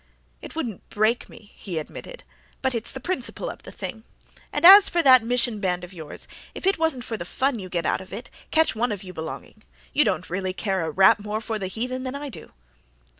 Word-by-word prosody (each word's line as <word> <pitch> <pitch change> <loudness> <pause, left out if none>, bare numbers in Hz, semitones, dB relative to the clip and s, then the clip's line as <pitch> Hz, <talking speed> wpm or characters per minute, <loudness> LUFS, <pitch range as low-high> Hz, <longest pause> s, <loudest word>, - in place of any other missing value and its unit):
"It - - -10
wouldn't 240 - -5
break 215 +3 +1
me," 210 -2 -15
he 180 -5 -6
admitted, - - -7 0.4
"but 265 -1 +1
it's 230 -1 0
the 265 - -6
principle 265 -3 -3
of - - -13
the - - -11
thing. 220 -2 -7 0.5
And - - +1
as 390 +2 +11
for 340 -1 +1
that 255 -3 +8
Mission 240 -2 0
Band 180 -3 -1
of 180 +2 -9
yours, 160 -4 -8 0.3
if - - -6
it 390 -3 +2
wasn't 320 -7 0
for 225 -2 -4
the 170 - -5
fun 260 +7 0
you 185 -2 -7
get 170 -2 -2
out - - +1
of 185 - -13
it, 220 +5 -7 0.2
catch 320 0 +3
one 235 +1 0
of 205 -2 -4
you 185 -1 -8
belonging. 160 -1 -7 0.3
You - - +5
don't - - -1
really 185 +1 -2
care 190 -1 -1
a 160 - -2
rap 190 +5 +5
more 210 +1 -3
for 220 -1 -3
the 190 - -2
heathen 250 +6 -3
than 255 +1 -4
I 285 0 -5
do." - - -11
220 Hz, 225 wpm, -24 LUFS, 190-260 Hz, 0.5 s, as